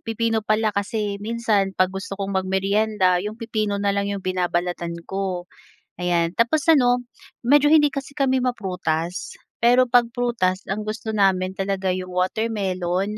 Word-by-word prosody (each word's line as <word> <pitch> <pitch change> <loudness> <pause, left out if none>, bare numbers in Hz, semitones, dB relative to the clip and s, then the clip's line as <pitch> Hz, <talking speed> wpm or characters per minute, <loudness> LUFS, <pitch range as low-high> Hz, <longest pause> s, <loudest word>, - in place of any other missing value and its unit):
Pipino 225 0 -1
pala 215 0 +1
kasi 200 0 -2
minsan 215 -3 0
'pag 185 0 +2
gusto 195 0 -6
kong 195 0 -3
mag-meryenda, 190 0 +1
'yong 210 +3 -5
pipino 215 -3 -2
na 200 0 0
lang 200 0 -1
'yong 200 -1 -4
binabalatan 175 -2 -1
ko. 190 -2 -3 0.5
Ayan, 175 -2 +1
tapos 240 +7 +3
ano, 245 -5 +5 0.4
medyo 290 +4 +4
hindi 295 -2 +6
kasi 275 0 -6
kami 270 -2 +1
ma-prutas. 180 -8 -2 0.2
Pero 245 +1 +4
'pag 245 -1 +5
prutas 230 -7 0
ang 210 +2 -2
gusto 220 +1 -5
namin 190 -3 +1
talaga 195 -1 -1
'yong 185 0 -2
watermelon, 190 0 -1
200 Hz, 145 wpm, -23 LUFS, 185-230 Hz, 0.5 s, hindi